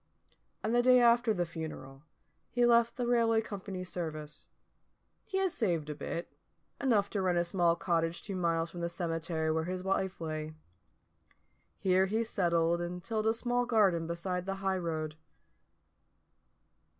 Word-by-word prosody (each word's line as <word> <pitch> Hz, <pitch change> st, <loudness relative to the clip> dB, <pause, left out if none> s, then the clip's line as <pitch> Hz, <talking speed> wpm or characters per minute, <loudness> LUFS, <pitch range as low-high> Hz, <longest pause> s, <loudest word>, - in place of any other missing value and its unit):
And 220 Hz, -, 0 dB
the 240 Hz, -, +5 dB
day 250 Hz, 0 st, +6 dB
after 235 Hz, -1 st, +5 dB
the 180 Hz, -4 st, 0 dB
funeral 155 Hz, -5 st, -7 dB, 0.5 s
he 245 Hz, -1 st, +2 dB
left 235 Hz, -1 st, +4 dB
the 245 Hz, -, -1 dB
railway 230 Hz, -2 st, +3 dB
company's 190 Hz, -4 st, -5 dB
service. 155 Hz, -3 st, -6 dB, 0.8 s
He 385 Hz, -, -3 dB
had 385 Hz, -1 st, +1 dB
saved 170 Hz, -, -1 dB
a -, -, -3 dB
bit, 160 Hz, +3 st, -5 dB, 0.5 s
enough 225 Hz, -7 st, +3 dB
to 200 Hz, -, -1 dB
rent 180 Hz, -2 st, +1 dB
a 175 Hz, -, +3 dB
small 170 Hz, -1 st, +2 dB
cottage 165 Hz, -1 st, -1 dB
two 200 Hz, -, -4 dB
miles 165 Hz, -2 st, 0 dB
from 175 Hz, -, -7 dB
the 170 Hz, -, -1 dB
cemetery 165 Hz, -2 st, -1 dB
where 160 Hz, 0 st, 0 dB
his 185 Hz, +1 st, -4 dB
wife 190 Hz, 0 st, -1 dB
lay. 155 Hz, -1 st, -4 dB, 1.2 s
Here 190 Hz, 0 st, +3 dB
he 220 Hz, +4 st, 0 dB
settled 170 Hz, -5 st, +1 dB
and 175 Hz, +1 st, -5 dB
tilled 220 Hz, +1 st, -1 dB
a 225 Hz, -, +4 dB
small 245 Hz, +1 st, 0 dB
garden 195 Hz, -8 st, +3 dB
beside 180 Hz, +2 st, -3 dB
the 195 Hz, -, -1 dB
high 190 Hz, -1 st, +1 dB
road. 155 Hz, -3 st, -3 dB
180 Hz, 155 wpm, -32 LUFS, 165-220 Hz, 1.2 s, day